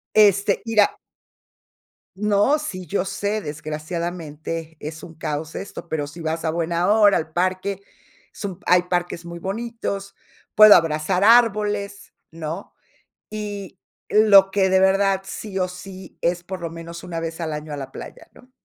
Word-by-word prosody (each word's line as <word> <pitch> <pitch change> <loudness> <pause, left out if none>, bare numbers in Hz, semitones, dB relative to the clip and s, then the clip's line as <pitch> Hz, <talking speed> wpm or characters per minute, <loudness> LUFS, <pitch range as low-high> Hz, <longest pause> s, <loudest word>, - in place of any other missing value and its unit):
Este, 200 -2 +4
mira 220 -2 +3 1.2
No, 210 +7 +3
sí, 185 - -6
yo 195 -2 -1
sé, 205 +2 -2
desgraciadamente 160 +1 -5
es 155 +1 -7
un 165 - -10
caos 155 -1 -4
esto, 195 - -7
pero 150 -3 -2
si 145 +4 -11
vas 160 +1 -2
a - - +1
buena 170 +2 0
hora, 210 -2 +5
al 160 0 -4
parque, 185 +3 -1 0.5
es - - -10
un 190 -2 -5
hay 180 0 +5
parques 175 -1 -2
muy 170 0 -7
bonitos, 200 0 -4 0.4
puedo 215 -1 +10
abrazar 165 +3 +1
árboles, 210 -3 +3 0.2
¿no?, 160 0 -6 0.6
y 205 -3 -6 0.3
lo 200 -3 +6
que 195 -1 +2
de 190 0 +4
verdad 195 0 +3
sí 195 0 -6
o 185 - +1
sí 185 0 -11
es 175 +1 0
por 185 +1 -7
lo 170 - -3
menos 170 +1 -9
una 170 -2 -4
vez 165 +1 -5
al 160 -2 -3
año 150 0 -6
a - - -4
la 135 -2 -7
playa, - - -10
¿no? 255 - -19
185 Hz, 160 wpm, -22 LUFS, 165-200 Hz, 1.2 s, puedo